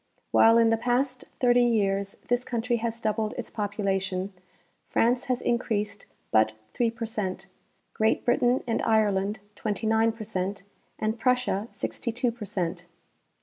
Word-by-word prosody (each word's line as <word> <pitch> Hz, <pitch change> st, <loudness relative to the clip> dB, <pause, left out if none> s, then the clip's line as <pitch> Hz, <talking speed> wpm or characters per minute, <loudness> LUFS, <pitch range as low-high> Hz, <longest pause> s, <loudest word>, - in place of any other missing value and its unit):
While 225 Hz, +1 st, +6 dB
in 230 Hz, -1 st, +5 dB
the 225 Hz, -, +3 dB
past 250 Hz, +2 st, 0 dB
thirty 245 Hz, -1 st, +5 dB
years 200 Hz, -4 st, +1 dB
this 245 Hz, 0 st, +1 dB
country 240 Hz, 0 st, -1 dB
has 230 Hz, 0 st, -3 dB
doubled 215 Hz, -1 st, -1 dB
its 245 Hz, -, -5 dB
population, 195 Hz, -2 st, -1 dB, 0.6 s
France 245 Hz, +2 st, +2 dB
has 255 Hz, -2 st, -1 dB
increased 210 Hz, -4 st, -1 dB, 0.2 s
but 110 Hz, 0 st, +4 dB, 0.2 s
3 235 Hz, -1 st, +2 dB
per 230 Hz, 0 st, -5 dB
cent, 195 Hz, -4 st, -3 dB, 0.5 s
Great 220 Hz, 0 st, +1 dB
Britain 245 Hz, +1 st, +3 dB
and 230 Hz, -2 st, 0 dB
Ireland 210 Hz, -2 st, +2 dB, 0.2 s
29 220 Hz, +1 st, +1 dB
j^er 220 Hz, -1 st, -7 dB
cent, 195 Hz, -1 st, -3 dB, 0.3 s
and 220 Hz, +1 st, -1 dB
Prussia 250 Hz, -4 st, +1 dB
62 245 Hz, +1 st, -2 dB
per 230 Hz, -2 st, -8 dB
cent. 175 Hz, -2 st, -3 dB
220 Hz, 140 wpm, -27 LUFS, 200-240 Hz, 0.6 s, While